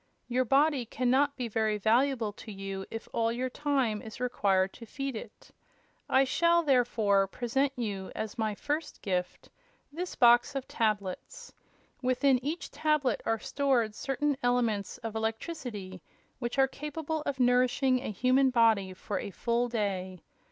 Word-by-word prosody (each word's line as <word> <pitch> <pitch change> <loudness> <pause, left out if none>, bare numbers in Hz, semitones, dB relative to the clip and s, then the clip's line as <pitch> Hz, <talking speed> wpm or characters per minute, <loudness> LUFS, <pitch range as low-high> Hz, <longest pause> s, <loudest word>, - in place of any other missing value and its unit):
Your 255 +1 +1
body 280 +1 +3
can 245 +1 0
not 280 +2 +3
be 250 -3 -3
very 220 -1 0
valuable 230 +1 +2
to 215 - -10
you 195 -1 -6
if 225 0 -7
all 230 0 +1
your 255 +2 -2
time 265 -8 0
is 220 +1 -10
required 195 -6 +1
to 230 - -11
feed 275 0 -4
it. 220 - -10 0.6
I 265 - +5
shall, 340 +5 +3
therefore, 230 -8 +3
present 260 +7 0
you, 200 -5 -4
as 220 -1 -4
my 220 -2 -1
first 295 +8 -4
gift, 180 -2 -3 0.4
this 350 +4 -5
box 240 +3 +5
of 270 -1 -3
tablets. 210 -5 -3 0.5
Within 255 0 +2
each 315 +5 -4
tablet 300 -6 +1
are 225 - +2
stored 250 -3 0
certain 275 +4 -1
elements 235 -5 0
of 225 -1 -5
electricity 220 - -4 0.4
which 240 +1 -3
are 270 0 +5
capable 300 +3 -4
of 275 -2 -2
nourishing 255 +1 +3
a 250 - -5
human 255 +5 +3
body 220 -6 +3
for 200 +2 -4
a - - -5
full 235 +4 -1
day. 190 -5 -3
245 Hz, 150 wpm, -30 LUFS, 215-270 Hz, 0.6 s, I